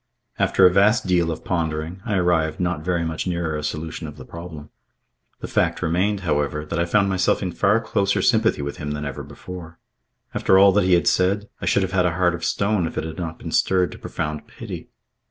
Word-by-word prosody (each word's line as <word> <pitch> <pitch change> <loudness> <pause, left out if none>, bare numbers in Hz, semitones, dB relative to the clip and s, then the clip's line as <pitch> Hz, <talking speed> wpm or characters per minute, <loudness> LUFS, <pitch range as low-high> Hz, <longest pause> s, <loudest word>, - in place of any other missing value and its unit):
After 95 - +4
a 90 - +6
vast 105 +5 +4
deal 90 -2 +2
of 80 - -5
pondering, 80 +1 -2
I 105 - 0
arrived 85 -4 +1
not 90 -3 -1
very 85 -1 0
much 80 +2 -3
nearer 85 -3 -1
a 75 - -3
solution 80 +2 -4
of 75 0 -10
the 65 - -10
problem. 85 -3 -9 0.7
The - - -4
fact - - 0
remained, 95 +5 +1
however, 75 -3 -1
that 85 +3 -3
I 85 - +2
found 100 +3 +2
myself 95 +1 +1
in 90 - -2
far 105 +5 +2
closer 100 -3 0
sympathy 110 -9 +2
with 70 0 -5
him 75 0 -4
than 75 0 -4
ever 70 -2 -5
before. 85 -3 -10 0.6
After 95 - +3
all 100 0 +7
that 100 0 +2
he 95 - +3
had 85 - +1
said, 100 +3 +2
I - - -3
should 100 - +3
have 95 - -2
had 90 -1 +2
a 85 - -2
heart 90 -1 +2
of 85 0 -6
stone 100 -2 +1
if - - -8
it - - -1
had 80 0 -6
not 80 -2 -4
been - - -7
stirred 90 -2 +2
to - - -10
profound 75 0 -4
pity. - - -8
90 Hz, 225 wpm, -22 LUFS, 80-95 Hz, 0.7 s, all